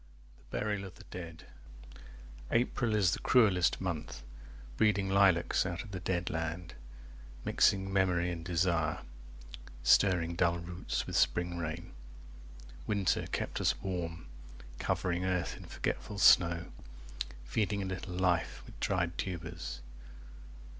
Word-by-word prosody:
THE -, -, -7 dB
BURIAL 105 Hz, -2 st, -1 dB
OF 95 Hz, -, -10 dB
THE -, -, -14 dB
DEAD 85 Hz, -2 st, -8 dB, 1.0 s
APRIL 120 Hz, -1 st, +1 dB
is 95 Hz, -4 st, +4 dB
the -, -, -1 dB
cruellest 100 Hz, -8 st, +4 dB
month, 80 Hz, -8 st, -4 dB, 0.5 s
breeding 100 Hz, -, +2 dB
Lilacs 95 Hz, -3 st, +4 dB
out 85 Hz, -, -3 dB
of 105 Hz, -, -11 dB
the 90 Hz, -, -4 dB
dead 90 Hz, -1 st, -1 dB
land, 80 Hz, +1 st, -3 dB, 0.7 s
mixing 95 Hz, 0 st, +3 dB
Memory 90 Hz, -2 st, +2 dB
and 85 Hz, -1 st, -5 dB
desire, 85 Hz, -2 st, +1 dB, 0.8 s
stirring 85 Hz, +4 st, +4 dB
Dull 85 Hz, 0 st, +2 dB
roots 85 Hz, +1 st, -4 dB
with -, -, -5 dB
spring 85 Hz, 0 st, +2 dB
rain. 80 Hz, +1 st, -5 dB, 1.0 s
Winter 100 Hz, -3 st, +1 dB
kept -, -, -3 dB
us -, -, +2 dB
warm, 85 Hz, -3 st, -3 dB, 0.5 s
covering 90 Hz, -1 st, 0 dB
5 95 Hz, -, 0 dB
Earth 90 Hz, -2 st, -1 dB
in -, -, -11 dB
forgetful 105 Hz, -, -3 dB
snow, 85 Hz, -3 st, +5 dB, 0.7 s
feeding 100 Hz, -, -1 dB
A -, -, -3 dB
little 90 Hz, -1 st, -5 dB
life 90 Hz, -3 st, 0 dB
with -, -, -14 dB
dried 90 Hz, -3 st, 0 dB
tubers. 85 Hz, -8 st, -5 dB
90 Hz, 125 wpm, -32 LUFS, 85-95 Hz, 1.0 s, snow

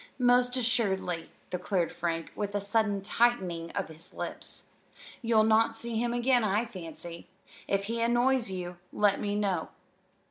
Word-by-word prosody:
"Most 245 Hz, 0 st, +4 dB
assuredly," 195 Hz, -8 st, 0 dB, 0.2 s
declared 180 Hz, -1 st, 0 dB
Frank, 165 Hz, -1 st, -2 dB
with 205 Hz, -1 st, -3 dB
a -, -, +2 dB
sudden 205 Hz, -1 st, +1 dB
tightening 190 Hz, -7 st, +1 dB
of -, -, -2 dB
his 160 Hz, +1 st, -13 dB
lips. -, -, -6 dB, 0.5 s
"You'll 225 Hz, -2 st, +4 dB
not 220 Hz, +1 st, +4 dB
see 230 Hz, 0 st, -4 dB
him 240 Hz, 0 st, 0 dB
again, 245 Hz, 0 st, +3 dB
I 210 Hz, +3 st, +2 dB
fancy. 170 Hz, -4 st, -8 dB, 0.4 s
If 200 Hz, 0 st, +1 dB
he 230 Hz, +3 st, -2 dB
annoys 240 Hz, 0 st, +3 dB
you, 180 Hz, -2 st, -5 dB
let 205 Hz, -1 st, +3 dB
me 205 Hz, 0 st, -1 dB
know." 200 Hz, -3 st, 0 dB
210 Hz, 145 wpm, -30 LUFS, 185-235 Hz, 0.5 s, Most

